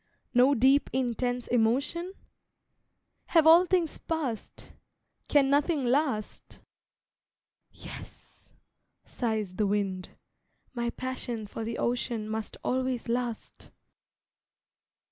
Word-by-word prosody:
No 260 +3 +5
deep, 265 +4 +4
intense 245 -1 -1
emotion? 270 +10 0 1.1
Have 325 -3 +4
all 335 +3 +7
things 350 -4 0
passed, 290 -9 -4 0.5
Can 285 -2 +4
nothing 290 -1 +2
last? 255 -4 -1 1.1
"Yes," - - -12 0.5
sighs 215 -6 -3
the 210 - +2
wind, 195 -2 -1 0.6
"My 235 -1 -1
passion 245 -3 -4
for 225 +2 -6
the 230 +1 -4
Ocean 235 -2 -1
Must 220 0 -5
always 255 -2 -1
last." 240 -1 -3
245 Hz, 90 wpm, -28 LUFS, 225-280 Hz, 1.1 s, all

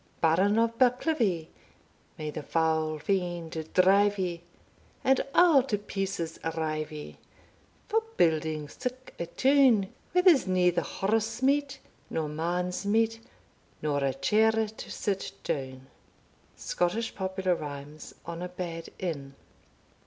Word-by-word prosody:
Baron 185 +6 +3
of 230 0 +1
Bucklivie, 245 - +2 0.7
May 155 -1 -4
the 155 - -5
foul 160 0 0
fiend 170 -3 -2
drive 200 +2 +5
ye, 175 -3 -2 0.6
And 265 0 +4
a' 330 -7 +6
to 210 - +1
pieces 195 -4 -4 0.2
rive 155 -1 -2
ye, 150 -1 -9 0.7
For 445 +1 +2 0.2
building 155 -2 +1
sic 255 - -6
a 170 - -3
town, 260 -4 +4 0.2
Where 360 0 +3
there's 335 - +6
neither 180 -2 +3
horse 220 +7 -1
meat, 275 0 +2 0.3
Nor 155 -2 -2
man's 175 +4 -2
meat, 225 +2 +1 0.6
Nor 145 -2 0
a 135 -1 0
chair 220 +1 +3 0.2
to 215 - -10
sit 195 -2 -3
down. 130 -2 -4 0.7
Scottish 195 +6 -1
Popular 190 -1 -1
Rhymes 145 -1 -7
on 170 0 -6
a 180 - -4
bad 170 -2 -6
Inn. 140 -6 -4
180 Hz, 125 wpm, -28 LUFS, 160-220 Hz, 0.7 s, a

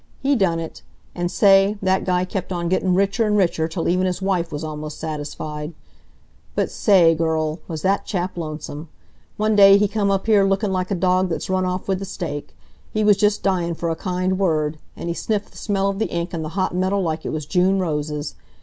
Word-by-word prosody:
He 275 +1 +2
done 180 -7 +1
it. 165 -1 -7 0.3
An' 175 0 -2
say, 195 +2 +4
that 190 -1 +1
guy 180 0 +1
kept 185 0 -5
on 170 -1 -2
gettin' 185 0 +1
richer 200 +4 +2
and 210 0 +2
richer 170 -4 +1
till 165 +1 -3
even 185 +2 +2
his 180 - -2
wife 185 -3 -1
was 150 +1 -4
almost 155 -1 -6
satisfied. 150 0 -5 0.8
But - - 0
sa 210 - +1
a 170 -4 +7
ay, - - +2
girl, 160 0 -1
was 160 -3 -5
that 195 +1 +2
chap 185 -2 -3
lonesome! 155 -1 -6 0.5
One 215 0 +1
day 200 -1 +8
he 210 0 +3
come 200 -1 0
up 195 -1 0
here 215 -3 +4
looking 195 +1 +1
like 185 -1 -1
a 200 - 0
dog 185 +1 +2
that's 170 +2 -3
run 185 0 +1
off 180 0 -3
with 190 -1 0
the 195 - -5
steak. 155 -6 -6 0.4
He 215 - 0
was 210 -1 +6
just 205 +1 +1
dyin' 175 -3 0
for 170 0 -2
a - - -1
kind 185 +2 -1
word, 155 -5 0 0.2
an' - - -5
he 170 - -1
sniffed 210 +3 -2
the - - -16
smell 195 -2 0
of 200 0 -2
the 220 - 0
ink 170 +2 -3
and 165 -2 -3
the 155 - -4
hot 185 - 0
metal 185 +2 0
like 160 -2 -2
it - - -3
was 155 -2 -4
June 185 +4 +2
roses. 150 -4 -2
185 Hz, 225 wpm, -21 LUFS, 165-195 Hz, 0.8 s, day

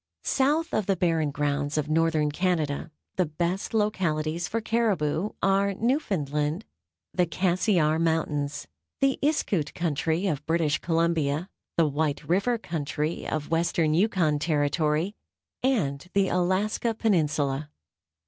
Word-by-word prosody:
South 300 +5 +1
of 215 - 0
the 195 - +3
Barren 165 -4 +1
Grounds 145 +1 -1
of 150 -1 0
northern 155 -1 +2
Canada 160 -3 -1 0.3
the 185 - +3
best 170 +5 -2
localities 175 -6 0
for 230 - -1
caribou 210 -6 0
are 195 0 +2
Newfoundland, 160 - -1 0.5
the 180 - +2
Cassiar 175 -2 +2
Mountains, 150 -3 -1 0.3
the 275 -1 +2
Iskoot 205 - 0
country 165 +2 0
of 150 -7 -1
British 160 -3 +1
Columbia, 165 -1 0 0.3
the 165 - +5
White 145 0 -1
River 200 +8 +2
country 155 -4 -3
of 155 0 -3
western 165 -1 +2
Yukon 170 -5 +2
Territory 150 +3 +1 0.5
and 175 - 0
the 195 -1 +3
Alaska 195 +6 0
Peninsula. 150 - +1
165 Hz, 120 wpm, -26 LUFS, 150-195 Hz, 0.5 s, the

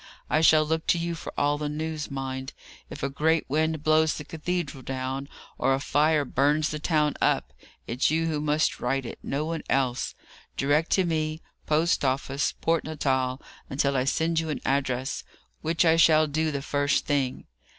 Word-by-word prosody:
I 155 - +3
shall 155 -1 +6
look 160 +1 -1
to - - +4
you 170 0 -2
for 165 - -7
all 145 0 +1
the 150 -1 -2
news, 155 0 -4
mind! 135 -1 -5 0.4
If - - -8
a - - +2
great 160 +3 +1
wind 155 +1 0
blows 155 0 +3
the 150 - -6
cathedral 160 -2 -3
down, 135 +2 -4 0.3
or 135 - +3
a - - -3
fire 150 +1 +2
burns 150 +4 +2
the 150 - -4
town 150 -1 +1
up, - - +1 0.3
it's 125 +3 +1
you 160 +2 +1
who 155 -2 -1
must 150 +1 +1
write 135 +1 -1
it; - - -7
no 145 +3 -2
one 165 0 -3
else 130 -2 0
will. - - -29 0.3
Direct 145 +4 +2
to 190 - +4
me 155 -1 -2 0.2
Post 155 +2 +2
office, 135 +1 0
Port 165 0 +1
Natal, 130 -4 -1 0.3
until 140 0 0
I 130 -1 +1
send 160 +4 +1
you 160 -1 -3
an 150 - -3
address, 135 -1 -1 0.4
which 165 +2 +1
I 165 0 +5
shall 155 -1 +6
do 155 +2 0
the 140 -2 -3
first 145 0 +1
thing. 140 -3 -1
150 Hz, 185 wpm, -26 LUFS, 135-160 Hz, 0.4 s, shall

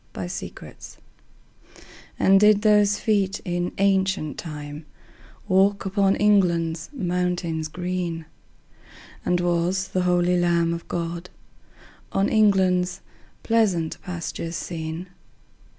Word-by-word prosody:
Y 95 - -4
Z 90 - -5
Jerusalem - - -12 1.4
AND 195 0 +5
did 210 0 +5
those 210 -1 +4
feet 200 -2 0
in 175 -1 -2
ancient 190 -6 +1
time 150 -1 -7 0.6
Walk 195 +1 +3
upon 195 0 +2
England's 170 -5 +2
mountains 180 - -2
green? 175 -1 -4 1.0
And 180 - +1
was 175 +2 0
the 185 - 0
holy 180 0 +2
Lamb 170 -1 +2
of 170 - -7
God 170 +1 -4 0.8
On 195 +1 +2
England's 185 -4 +2 0.4
pleasant 195 -8 +1
pastures 170 -1 -5
seen? 165 +1 -5
180 Hz, 105 wpm, -24 LUFS, 170-195 Hz, 1.4 s, AND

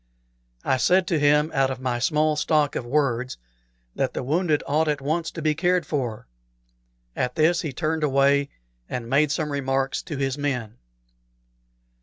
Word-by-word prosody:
I 130 - +2
said 185 +7 +3
to 165 -4 +1
him, 150 +2 +3
out 135 -1 +2
of 130 -1 -4
my 125 -2 -2
small 150 +4 +2
stock 150 -1 +1
of 120 - -4
words, 130 -2 0 0.6
that - - -1
the - - -2
wounded 155 +2 +1
ought 155 +2 +1
at 150 -1 0
once 160 +4 -1
to 165 - -7
be 155 -1 +2
cared 175 +1 +1
for. 125 -8 -3 0.9
At 125 - -2
this 165 +2 +3
he 155 - -4
turned 155 +3 -2
away 140 0 +3 0.4
and 120 -2 -4
made 140 +4 +3
some 150 0 -1
remarks 135 -1 -1
to 150 - -6
his 135 +1 -2
men. 125 -6 -3
145 Hz, 165 wpm, -24 LUFS, 135-155 Hz, 0.9 s, said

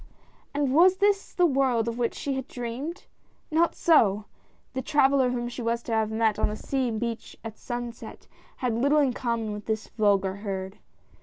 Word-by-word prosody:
And 285 -2 0
was 360 +5 +6
this 400 0 +1
the 360 - +3
world 260 -6 +2
of 235 +1 -3
which 235 - 0
she 280 - -3
had 265 0 -4
dreamed? 255 +9 -5 0.5
Not 330 +2 +2
so! 215 - +3 0.5
The 260 - -2
traveller 270 -2 +3
whom 240 -1 -2
she 240 +1 -6
was 235 0 -1
to - - -6
have 220 -1 +1
met 220 -1 +1
on - - +2
the 210 - -4
sea 260 +2 -1
beach 230 0 -4
at 225 -1 -8
sunset, 240 -1 -6 0.3
had 250 -3 -1
little 280 +6 +2
in 280 -4 +3
common 235 -3 -2
with 210 0 -8
this 220 -1 -2
vulgar 200 -2 +2
herd. 195 -2 -5
240 Hz, 180 wpm, -26 LUFS, 220-275 Hz, 0.5 s, was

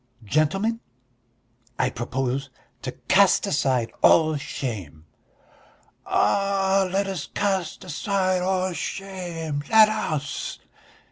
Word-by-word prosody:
Gentlemen! 195 - +1 1.0
I - - +1
propose 130 +3 -2 0.3
to - - -5
cast - - +5
aside 130 -5 0
all 155 -1 +5
shame." 100 - -5 1.0
"Ah, 195 -1 +2
let 195 +1 +1
us 190 -6 -4
cast 190 -5 -2
aside 185 +1 0
all 185 0 0
shame, 170 -6 -4
let 220 -1 +7
us!" 155 -9 -3
180 Hz, 90 wpm, -24 LUFS, 140-195 Hz, 1.0 s, let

